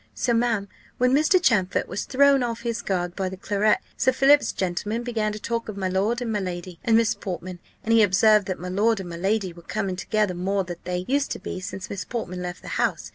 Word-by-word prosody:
So, 240 - 0
ma'am, 230 -4 +1 0.3
when 250 +1 +3
Mr. 310 +6 +4
Champfort 210 - +2
was 190 - -4
thrown 280 0 +4
off 235 -1 -2
his 235 -1 -2
guard 180 -2 -2
by 190 -2 -2
the 190 - -8
claret, 205 +2 +2 0.2
Sir 260 - +3
Philip's 275 +3 +4
gentleman 200 +5 -2
began 225 -3 -1
to 210 - -5
talk 230 +1 -3
of 205 - -6
my 190 -1 -1
lord 210 +7 0
and 230 - -3
my 210 - 0
lady, 180 -2 -5
and 230 -3 +4
Miss 225 -1 +3
Portman; 185 -3 -6 0.2
and 225 - +1
he 225 - +6
observed 210 +1 +4
that 185 - -2
my 180 - -6
lord 215 +4 +2
and 185 -2 -6
my 170 - -6
lady 195 0 0
were 170 - -13
coming 195 +1 -3
together 210 +1 0
more 190 +3 -1
than 175 -1 -7
they 180 0 -2
used 280 +2 +1
to - - -7
be - - -5
since 185 0 -6
Miss 200 -1 -5
Portman 185 -7 -5
left 180 0 -6
the - - -10
house. - - -1
205 Hz, 235 wpm, -24 LUFS, 185-230 Hz, 0.3 s, he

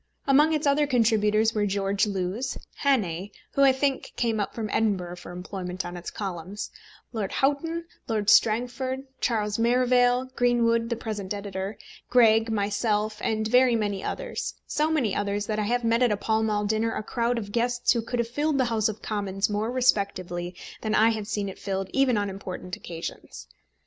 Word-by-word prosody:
Among 290 +3 +5
its 305 -1 0
other 290 +1 +3
contributors 220 -3 +3
were 210 -1 +1
George 195 +1 +1
Lewes, 195 +5 -2 0.2
Hannay, 200 - +1 0.2
who, 275 - 0
I 275 -1 +7
think, 270 +1 -1
came 225 -2 0
up 205 - -2
from 225 -2 -3
Edinburgh 185 -5 0
for 180 - -10
employment 180 0 -5
on 175 0 -6
its 175 0 -6
columns, 190 0 -5 0.4
Lord 210 -4 -2
Houghton, 325 +5 0 0.2
Lord 215 -3 -1
Strangford, 250 +5 +3 0.2
Charles 210 -2 0
Merivale, 245 +1 +3
Greenwood 230 -1 +2
the 235 - 0
present 210 -3 -4
editor, 200 0 -5 0.3
Greg, 225 -2 +5
myself, 210 +1 0
and 220 -1 0
very 250 +1 +5
many 205 -3 -1
others; - - -4
so 300 +1 0
many 270 -11 +1
others, 205 0 -1
that 215 0 -2
I 210 - 0
have 245 +3 0
met 230 +1 +2
at 245 -3 +4
a 210 - +1
Pall 220 +2 0
Mall 210 -1 0
dinner 220 +2 0
a - - -3
crowd 235 +2 0
of 205 -3 -5
guests 240 +2 +1
who 235 - 0
would 245 +2 -3
have 235 -1 0
filled 290 +4 0
the 260 - +3
House 220 -1 +2
of 215 - -7
Commons 200 -1 -1
more 210 +2 -1
respectably 190 -8 0 0.3
than 215 -1 0
I 220 +1 +5
have 215 -2 -4
seen 205 -2 -2
it 195 - -8
filled 195 -1 -3
even 270 -4 +3
on 205 0 0
important 185 -2 -6
occasions. 165 - -8
220 Hz, 180 wpm, -26 LUFS, 200-245 Hz, 0.4 s, I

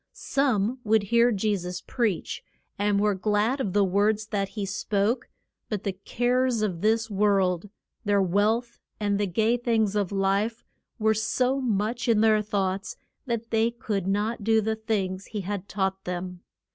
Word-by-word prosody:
Some 255 -3 0
would 220 -1 +3
hear 235 +4 +4
Je 210 0 +1
sus 180 0 -5
preach, 225 -8 -2 0.4
and 205 0 +2
were 210 0 +3
glad 210 +6 +1
of 195 -8 -2
the 205 - +4
words 205 +3 +2
that 200 -2 -1
he 205 -1 -4
spoke; 200 +4 -1 0.4
but 210 -3 -3
the 195 - -1
cares 245 +4 0
of 180 -5 -2
this 220 +1 +1
world, 195 -2 +2 0.3
their 205 -1 +2
wealth, 215 +6 +1 0.2
and 205 -1 0
the 205 - +1
gay 220 +6 +2
things 225 -4 +1
of 205 -3 0
life, 200 +3 0 0.3
were 220 -1 +3
so 250 +5 0
much 225 0 -1
in 225 -2 +4
their 215 -1 +4
thoughts 195 -2 -2 0.3
that 230 -1 -3
they 225 0 +3
could 210 -5 -3
not 210 +3 -1
do 220 +1 +4
the 220 +1 0
things 195 -4 -2
he 210 -2 -4
had 200 0 -5
taught 190 -1 -1
them. 180 0 -5
210 Hz, 165 wpm, -26 LUFS, 195-225 Hz, 0.4 s, hear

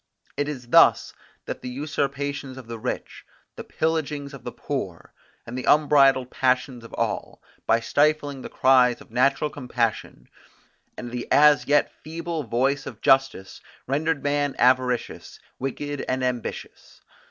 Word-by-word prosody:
It 145 0 -1
is 125 -5 -7
thus - - +5 0.3
that - - -6
the 125 - -6
usurpations 140 0 -3
of 130 - -10
the 115 0 -7
rich, - - -5 0.3
the - - -7
pillagings 150 -3 -2
of 140 - -11
the 120 - -5
poor, 95 - -6 0.3
and 120 - -8
the 130 - -4
unbridled 135 -4 +4
passions 125 -1 0
of 115 - -12
all, - - -3 0.3
by 115 - +3
stifling 145 +1 +1
the - - -8
cries 125 -2 +4
of - - -17
natural 140 +5 +1
compassion, 120 - -3 0.7
and 120 -1 -7
the 120 -1 -5
as 150 0 +5
yet 145 0 +3
feeble 165 +1 -4
voice 135 +3 -1
of - - -9
justice, 135 -8 +1 0.2
rendered 150 +3 -1
man 145 -1 0
avaricious, 125 -1 +1 0.2
wicked 145 +2 -4
and 130 0 -1
ambitious. 125 -3 -5
135 Hz, 140 wpm, -24 LUFS, 125-145 Hz, 0.7 s, thus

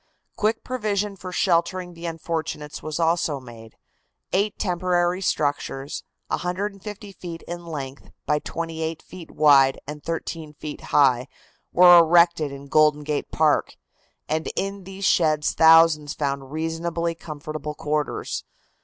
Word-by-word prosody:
Quick 215 +1 0
provision 210 -5 -2
for 185 -1 -8
sheltering 175 0 0
the 170 0 -7
unfortunates 160 -2 -4
was 155 +1 -4
also 165 -3 +1
made. 115 -3 -13 0.6
Eight 200 +2 +1
temporary 180 -1 0
structures, 145 -4 -2 0.3
150 200 +3 -4
feet 170 -3 -8
in 175 0 -7
length 140 -4 -7 0.2
by 150 -1 +1
28 160 0 -4
feet 180 -3 -11
wide 140 -3 +5
and 150 +1 -8
13 165 -2 -5
feet 150 -1 -7
high, 130 -3 +3 0.4
were 175 -1 +8
erected 170 -2 +4
in 140 0 -9
Golden 150 +1 +3
Gate 150 0 -3
Park, 155 -2 +1 0.5
and 160 +1 -1
in 195 -1 -3
these 195 +1 -6
sheds 155 -5 +3
thousands 160 -2 +5
found 140 -2 -3
reasonably 165 +2 -2
comfortable 155 -2 -7
quarters. 150 0 -2
165 Hz, 125 wpm, -24 LUFS, 150-175 Hz, 0.6 s, were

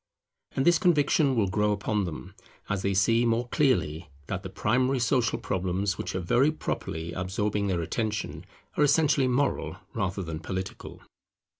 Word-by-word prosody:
And 135 - +1
this 175 -1 +5
conviction 150 -4 +3
will 110 -4 +3
grow 105 +2 +1
upon 105 0 0
them, 75 -7 -7 0.4
as 100 - -1
they 100 0 0
see 115 +5 +3
more 120 +1 +1
clearly 90 - +1 0.2
that 95 +5 -3
the 95 - -7
primary 125 +7 +1
social 120 -1 +1
problems 95 +1 -1
which - - -4
are - - 0
very 120 - +3
properly 85 - -4
absorbing 100 +2 -1
their 90 -3 0
attention 110 +4 -3 0.3
are - - +3
essentially 145 -2 +3
moral 135 +3 0 0.2
rather 95 0 -2
than 80 -2 -5
political. 95 +3 -6
105 Hz, 155 wpm, -27 LUFS, 95-130 Hz, 0.4 s, this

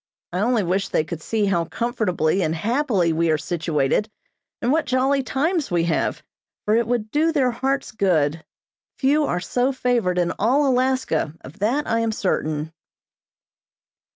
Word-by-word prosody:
I 180 - -1
only 230 +1 +2
wish 185 +3 -1
they - - +1
could 160 0 -6
see 215 +4 0
how 175 -4 +1
comfortably 195 -7 0
and 160 -2 0
happily 205 - +1
we 165 +1 +1
are 155 - +3
situated, 160 +3 0 0.5
and 240 - 0
what 315 -1 +1
jolly 265 +2 +2
times 305 +5 -1
we 175 -1 +1
have, 165 -1 -1 0.4
for 210 - +3
it 230 -1 +2
would 230 -3 -1
do 315 +2 +2
their 270 -6 +2
hearts 270 +3 -2
good. 165 -7 +1 0.5
Few 290 +3 +2
are 175 - -1
so 250 +8 0
favored 240 -8 0
in 175 -1 +1
all 260 +8 +3
Alaska, 255 - +1
of 135 - -13
that 245 +9 +1
I 230 - 0
am 230 -1 0
certain. 155 -6 -2
215 Hz, 160 wpm, -22 LUFS, 170-260 Hz, 0.5 s, are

